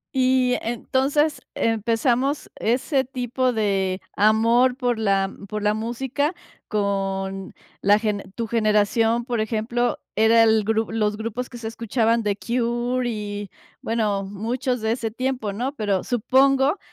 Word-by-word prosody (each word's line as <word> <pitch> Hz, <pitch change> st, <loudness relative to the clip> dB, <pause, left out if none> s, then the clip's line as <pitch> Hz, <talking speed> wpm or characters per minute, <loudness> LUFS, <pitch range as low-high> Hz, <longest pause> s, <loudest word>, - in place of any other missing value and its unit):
Y 255 Hz, -1 st, +3 dB
entonces 275 Hz, +6 st, 0 dB
empezamos 235 Hz, +5 st, 0 dB
ese 260 Hz, +4 st, +1 dB
tipo 255 Hz, 0 st, -1 dB
de 195 Hz, -4 st, 0 dB, 0.2 s
amor 230 Hz, +4 st, +4 dB
por 245 Hz, -4 st, 0 dB
la 195 Hz, -2 st, +1 dB, 0.2 s
por 210 Hz, -1 st, -4 dB
la 210 Hz, 0 st, +3 dB
música 265 Hz, -, -2 dB, 0.3 s
con 195 Hz, -2 st, -2 dB, 0.3 s
la 205 Hz, +1 st, +5 dB
gene 210 Hz, -2 st, -2 dB
tu 230 Hz, -, -2 dB
generación, 225 Hz, +1 st, +2 dB
por 240 Hz, -3 st, -2 dB
ejemplo, 230 Hz, +2 st, -1 dB, 0.2 s
era 225 Hz, +1 st, +5 dB
el 220 Hz, -1 st, +4 dB
gru 220 Hz, 0 st, 0 dB
los 210 Hz, -2 st, 0 dB
grupos 230 Hz, +3 st, -4 dB
que 240 Hz, -, -9 dB
se 225 Hz, -1 st, -6 dB
escuchaban, 230 Hz, 0 st, 0 dB
The 205 Hz, -2 st, 0 dB
Cure 240 Hz, +1 st, -1 dB
y, 205 Hz, -2 st, -5 dB, 0.3 s
bueno, 210 Hz, -3 st, 0 dB
muchos 230 Hz, +5 st, -2 dB
de 220 Hz, -, 0 dB
ese 230 Hz, -1 st, -1 dB
tiempo, 250 Hz, -2 st, -2 dB
¿no? 250 Hz, +7 st, -2 dB
Pero, 205 Hz, -6 st, 0 dB
supongo 270 Hz, -, +3 dB
230 Hz, 135 wpm, -23 LUFS, 210-250 Hz, 0.3 s, la